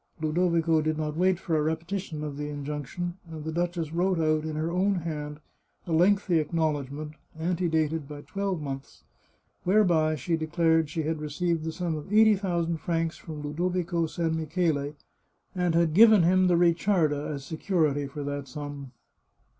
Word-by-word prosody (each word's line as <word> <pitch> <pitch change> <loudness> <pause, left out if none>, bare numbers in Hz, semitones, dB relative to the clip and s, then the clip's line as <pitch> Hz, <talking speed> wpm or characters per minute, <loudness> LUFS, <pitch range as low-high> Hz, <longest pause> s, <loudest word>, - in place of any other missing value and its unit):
Ludo 160 +3 +1
vico 165 -1 +2
did 155 0 -1
not 150 -1 -2
wait 185 +2 +3
for 170 -4 -1
a 155 - +2
repetition 160 +1 -3
of 150 -2 -4
the 145 +1 -4
injunction, 150 +5 -4
and 160 -2 -7
the 160 - -2
duchess 170 -1 -2
wrote 180 +2 +1
out, 155 -1 +1
in 155 -1 -3
her 160 +2 -1
own 190 +3 +2
hand, 150 -4 -4 0.5
a 170 - -6
lengthy 175 0 +3
acknowledg 150 -4 -1
ment, 150 +2 -6 0.3
antedated 160 -3 0
by 145 0 -8
twelve 195 +1 -3
months, 135 -2 -7 0.6
whereby 175 -5 +3
she 165 +4 -1
declared 160 0 +2
she 160 +1 -2
had 155 0 -2
received 160 +2 -1
the 160 - -2
sum 175 0 -2
of 155 +5 -7
eighty 220 0 +6
thousand 170 -4 -1
francs 165 +1 -1
from 155 -3 -8
Ludo 155 +5 -1
vico 175 -2 -1
San 165 0 -1
Michele, 155 -2 -1 0.6
and 180 -3 0
had 170 -2 +3
given 215 0 +7
him 185 +2 +4
the 175 - +4
Ricciarda 170 -3 +2
as 140 -2 -5
se 160 - -6
curity 155 -7 +1
for 145 +1 -6
that 145 -1 -4
sum. 140 -1 -7
160 Hz, 175 wpm, -27 LUFS, 150-175 Hz, 0.6 s, given